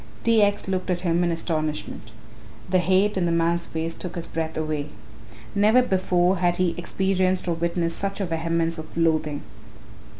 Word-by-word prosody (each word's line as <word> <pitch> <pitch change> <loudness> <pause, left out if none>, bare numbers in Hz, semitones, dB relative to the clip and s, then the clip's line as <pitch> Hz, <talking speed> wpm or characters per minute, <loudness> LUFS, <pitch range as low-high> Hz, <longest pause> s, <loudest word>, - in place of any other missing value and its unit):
T. 230 -2 +4
X. 205 0 +1
looked 185 0 -2
at 175 -1 0
him 175 -1 +1
in 170 - +1
astonishment. 155 -8 -3 0.6
The 185 0 +3
hate 190 +4 +2
in 175 -2 +1
the - - +1
man's 170 +1 +1
face 165 +1 -3
took 180 0 -7
his 170 -1 0
breath 160 0 -4
away. 155 -2 -2 0.7
Never 215 +5 +4
before 185 -3 +2
had 175 0 +1
he 180 -2 +1
experienced 185 +1 0
or 170 - +1
witnessed 170 0 -1
such 195 0 -2
a 195 - 0
vehemence 165 0 -1
of 155 - -9
loathing. 155 -3 +1
175 Hz, 170 wpm, -24 LUFS, 165-185 Hz, 0.7 s, T